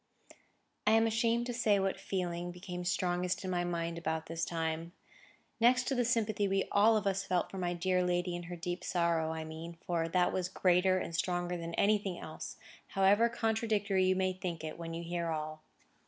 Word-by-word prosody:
I 215 - +6
am 225 0 +5
ashamed 230 +1 +1
to 245 - -3
say 230 -4 +3
what 195 0 -1
feeling 175 -2 -3
became 180 0 -6
strongest 180 0 0
in 185 - -2
my 175 -1 +1
mind 170 -1 -2
about 160 -1 -2
this 165 0 -4
time; 165 0 -2 0.7
next 245 +2 +5
to 270 - -1
the 245 -2 +2
sympathy 220 -3 +1
we 195 0 +1
all 215 +2 +5
of 210 - -2
us 195 0 +1
felt 180 -3 0
for 195 - -5
my 175 -1 -1
dear 180 +1 +1
lady 175 0 0
in 175 - -4
her 175 - -4
deep 175 +1 -4
sorrow, 170 -2 +1
I 160 0 -4
mean; 165 +2 -8
for 165 -2 0
that 180 +1 +2
was 180 -1 -1
greater 185 0 +3
and 170 -2 -3
stronger 175 0 -1
than 170 -1 -5
anything 200 -3 +2
else, 155 - -7 0.3
however 200 +4 +4
contradictory 220 -4 +1
you 185 0 +3
may 185 0 +1
think 180 -3 -5
it, 155 +1 -6
when 165 -1 -5
you 170 - -4
hear 170 0 -2
all. 155 0 -4
180 Hz, 200 wpm, -33 LUFS, 170-200 Hz, 0.7 s, I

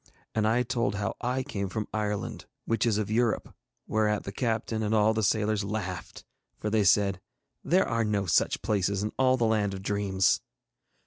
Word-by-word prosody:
And 110 -1 +1
I 120 +3 +3
told 120 -2 -1
how 100 -1 -2
I 125 +2 -1
came 100 -5 -4
from 110 +1 -3
Ireland, 105 -2 -3 0.2
which 115 0 +1
is 110 -3 +2
of 105 -1 -2
Europe, 115 0 0 0.3
whereat 105 -1 +1
the 100 - -5
captain 110 0 -1
and 110 +1 +1
all 110 +1 +4
the 110 - 0
sailors 105 0 +1
laughed, 100 -3 -5 0.3
for 105 - -3
they 110 -1 +3
said, 100 0 +3 0.4
'There 185 +3 +3
are 115 0 +1
no 105 -2 0
such 80 - +1
places 100 -1 0
in 105 - -2
all 130 0 +4
the 120 - +2
land 105 -3 +1
of 95 - -8
dreams.' 100 -2 +1
105 Hz, 185 wpm, -28 LUFS, 100-110 Hz, 0.4 s, all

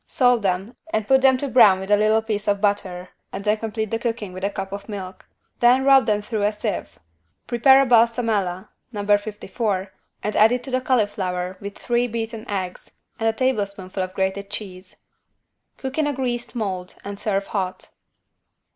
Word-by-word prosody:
Salt 245 -3 +3
them 195 +4 -1 0.2
and 215 -1 -1
put 265 0 +5
them 265 -1 +5
to 280 - -3
brown 210 -8 +6
with 190 +2 -5
a - - +8
little 215 +1 +3
piece 215 -2 -3
of 200 -1 +2
butter 190 -3 -1 0.2
and 195 - -6
then 210 +1 +2
complete 220 -1 -4
the 225 - -1
cooking 225 -5 -3
with 185 +1 -8
a 200 - +1
cup 195 -1 -5
of 200 +2 -7
milk. 190 -3 -7 0.3
Then 250 +2 +5
rub 270 -3 +6
them 210 -1 +1
through 215 0 -3
a 205 +1 +2
sieve. 210 -2 -4 0.5
Prepare 265 +3 +5
a - - 0
=Balsamella= 225 -6 +2 0.2
(No. 205 -3 -4
54) 205 -1 -1 0.3
and 210 - -2
add 215 +2 +6
it 245 0 -1
to 265 - -7
the 255 0 +1
cauliflower 190 -7 -1
with 200 0 -7
3 240 0 0
beaten 225 -1 -5
eggs 185 -3 -4 0.3
and 225 0 +2
a - - 0
tablespoonful 200 -6 -2
of 185 0 -4
grated 190 +1 -2
cheese. 185 -3 -8 0.7
Cook 265 +3 -4
in 305 - +2
a 290 - 0
greased 245 -2 -3
mold 190 -5 -3
and 200 0 -6
serve 200 -2 -1
hot. 185 -3 -4
210 Hz, 185 wpm, -22 LUFS, 195-235 Hz, 0.7 s, a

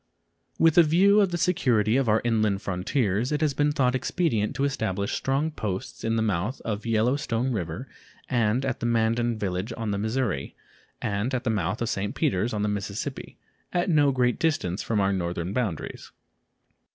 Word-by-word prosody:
With 165 +1 +5
a - - +11
view 185 +6 +5
to 200 - +5
the 175 -1 -3
security 120 - +2
of 135 -3 +2
our 110 +1 +3
inland 110 -4 +1
frontiers, 100 +5 0
it 150 +1 0
has 150 -3 +2
been 145 +2 +2
thought 130 -4 +2
expedient 130 - 0
to 135 - -1
establish 100 -8 -1
strong 140 +4 0
posts 100 -10 -5
at 115 0 0
the 110 - +1
mouth 105 +4 -1
of 110 0 -4
Yellow 115 +3 +2
Stone 125 -2 -1
River 95 +3 -4 0.4
and 120 +1 +1
at 130 -3 -2
the 120 - -1
Mandan 115 0 +1
village 95 +1 -3
on 115 -2 -2
the 100 - -1
Missouri, 110 - -2 0.5
and 105 +6 -1
at 125 - -2
the 120 - +1
mouth 105 +1 -1
of 115 - -1
St. 100 +1 -2
Peters 95 +6 0
on 105 -1 -1
the - - +1
Mississippi, 105 0 -4 0.3
at 175 0 +1
no 145 -3 +4
great 125 -2 +1
distance 145 - 0
from 110 -2 -1
our 100 0 +2
northern 85 0 -2
boundaries. 110 -9 -3
115 Hz, 185 wpm, -26 LUFS, 100-135 Hz, 0.5 s, a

